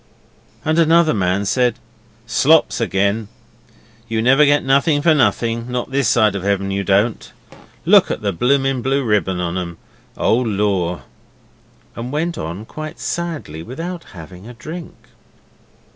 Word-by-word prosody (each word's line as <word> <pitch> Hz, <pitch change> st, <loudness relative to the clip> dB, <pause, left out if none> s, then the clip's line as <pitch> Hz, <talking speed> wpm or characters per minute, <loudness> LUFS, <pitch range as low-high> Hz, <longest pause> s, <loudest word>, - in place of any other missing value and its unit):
And 155 Hz, +2 st, +2 dB
another 165 Hz, 0 st, +4 dB
man 95 Hz, -1 st, 0 dB
said, 125 Hz, +2 st, +1 dB, 0.5 s
'Slops 140 Hz, +5 st, +3 dB
again! 100 Hz, +1 st, 0 dB, 0.8 s
You 115 Hz, 0 st, -2 dB
never 135 Hz, +5 st, +5 dB
get 145 Hz, 0 st, +3 dB
nothing 140 Hz, +2 st, +2 dB
for 165 Hz, -1 st, +5 dB
nothing, 115 Hz, -4 st, 0 dB
not 125 Hz, +1 st, -3 dB
this 135 Hz, -3 st, +1 dB
side 110 Hz, -2 st, +3 dB
of 100 Hz, -, -4 dB
heaven 100 Hz, 0 st, -1 dB
you 100 Hz, 0 st, -1 dB
don't. 100 Hz, +4 st, 0 dB, 0.5 s
Look -, -, +5 dB
at -, -, -4 dB
the 100 Hz, -2 st, 0 dB
bloomin' 135 Hz, +5 st, +1 dB
blue 135 Hz, +2 st, 0 dB
ribbon 105 Hz, -5 st, 0 dB
on 90 Hz, +1 st, -2 dB
'em! 85 Hz, -2 st, -6 dB, 0.4 s
Oh, 110 Hz, -, +2 dB
Lor'!' 100 Hz, -6 st, -1 dB, 0.9 s
and 120 Hz, +2 st, -6 dB
went 165 Hz, +4 st, -1 dB
on 85 Hz, +7 st, -6 dB
quite 155 Hz, +5 st, -8 dB
sadly 160 Hz, -, -4 dB
without 165 Hz, -, -6 dB
having 90 Hz, +4 st, -11 dB
a 120 Hz, -, -10 dB
drink. 160 Hz, +7 st, -8 dB
115 Hz, 145 wpm, -19 LUFS, 100-140 Hz, 0.9 s, never